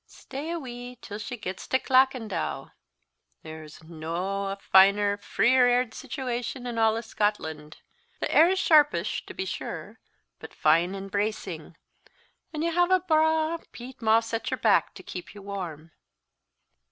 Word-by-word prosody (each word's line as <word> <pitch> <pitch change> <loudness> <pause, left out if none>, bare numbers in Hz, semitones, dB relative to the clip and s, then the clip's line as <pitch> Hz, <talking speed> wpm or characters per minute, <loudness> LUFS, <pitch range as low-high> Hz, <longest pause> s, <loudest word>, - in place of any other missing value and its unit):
"Stay 285 +4 -8
a 340 - -2
wee 245 -4 -8
till 205 0 -8
she 245 +3 -6
gets 190 -3 -6
to 260 - +3
Clackandow! 255 -5 +1 0.7
There's 155 0 -10
no 170 +5 -3
a 195 - -3
finer, 200 +1 +4
freer 250 +4 +3
aired 245 -1 +2
situation 250 0 -4
in 235 -2 -3
a' 225 +1 +2
Scotland. 160 -9 -2 0.4
The - - -2
air's 355 +4 +5
sharpish, 300 -5 +3
to - - -9
be 380 - -3
sure, - - -6 0.4
but - - -11
fine 165 +5 +3
and 195 0 -7
bracing; 190 -6 -3 0.7
and 310 0 -3
you 335 - +1
have 350 +1 +2
a 370 0 +5
braw 315 -1 +2
peat 250 +1 -11
moss 225 +1 +2
at 225 - -2
your - - -2
back - - +2
to - - -11
keep 180 +2 -8
you 205 - -11
warm." 170 -6 -6
225 Hz, 150 wpm, -27 LUFS, 190-260 Hz, 0.7 s, air's